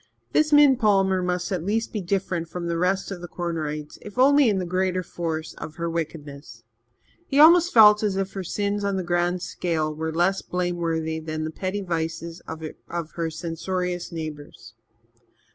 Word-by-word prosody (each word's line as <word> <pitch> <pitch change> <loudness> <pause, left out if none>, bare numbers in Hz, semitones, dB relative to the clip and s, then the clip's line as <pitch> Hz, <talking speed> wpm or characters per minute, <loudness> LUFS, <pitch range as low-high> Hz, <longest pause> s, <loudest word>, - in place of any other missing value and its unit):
This 310 0 +2
Min 290 -3 +7
Palmer 195 -5 +3
must 180 0 -2
at 180 -4 -1
least 220 +4 -1
be 210 - -2
different 180 -2 -2
from 175 +1 -5
the 170 -1 -1
rest 190 +2 0
of 180 -3 -6
the 175 - -6
Cornerites, 155 -4 -4
if 210 +1 -11
only 280 0 +5
in 200 - +1
the 185 - -2
greater 185 +1 0
force 165 -2 -4
of 155 - -7
her 170 0 -3
wickedness. 145 -7 -6 0.6
He 275 - +1
almost 340 +3 +7
felt 210 -2 +7
as 210 -3 0
if 195 0 -2
her 195 - -4
sins 205 +3 -2
on 200 -1 0
the 185 - -2
grand 175 +1 0
scale 160 -3 -2
were 160 +1 -3
less 175 +4 +1
blameworthy 170 -3 -2
than 155 0 -4
the 155 - -3
petty 190 +4 -3
vices 165 -1 -4
of 160 0 -7 0.5
her 165 -1 -2
censorious 175 +2 -3
neighbours. 150 -8 -8
175 Hz, 175 wpm, -24 LUFS, 160-195 Hz, 0.6 s, Min